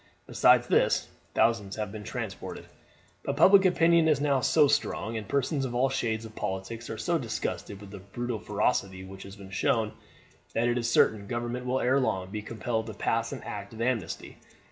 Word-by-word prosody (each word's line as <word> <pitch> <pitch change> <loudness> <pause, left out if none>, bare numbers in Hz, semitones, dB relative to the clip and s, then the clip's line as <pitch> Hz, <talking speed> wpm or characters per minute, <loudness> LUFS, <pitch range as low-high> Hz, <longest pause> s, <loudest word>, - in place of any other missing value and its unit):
Besides - - +5
this, - - +2 0.3
thousands 110 -3 +2
have 105 -2 -3
been 105 0 -7
transported. - - -6 0.6
But - - -2
public 195 0 +7
opinion 170 -2 +4
is 155 -3 +3
now 140 -2 +2
so 150 +3 +5
strong, 115 -4 0
and 110 -3 -4
persons 140 - 0
of 125 -2 -3
all 130 +2 +3
shades 115 -4 -1
of 110 -1 -11
politics 95 +5 -4
are - - -4
so - - 0
disgusted 100 - -4
with 100 -1 -11
the 100 - -8
brutal 115 +4 -4
ferocity 100 -3 -1
which 95 0 -10
has 100 0 -10
been 100 -2 -12
shown, 105 +2 +1 0.6
that 115 +1 +2
it 120 0 +1
is 115 -1 -1
certain 105 -3 +3
government 120 +2 -3
will 130 +1 +1
ere 130 +3 +3
long 95 -7 -1
be 105 - -4
compelled 110 +1 -3
to 110 - -7
pass 115 +2 0
an - - -6
act 100 +1 -6
of 110 - -7
amnesty. 125 -2 -2
115 Hz, 190 wpm, -28 LUFS, 100-125 Hz, 0.6 s, public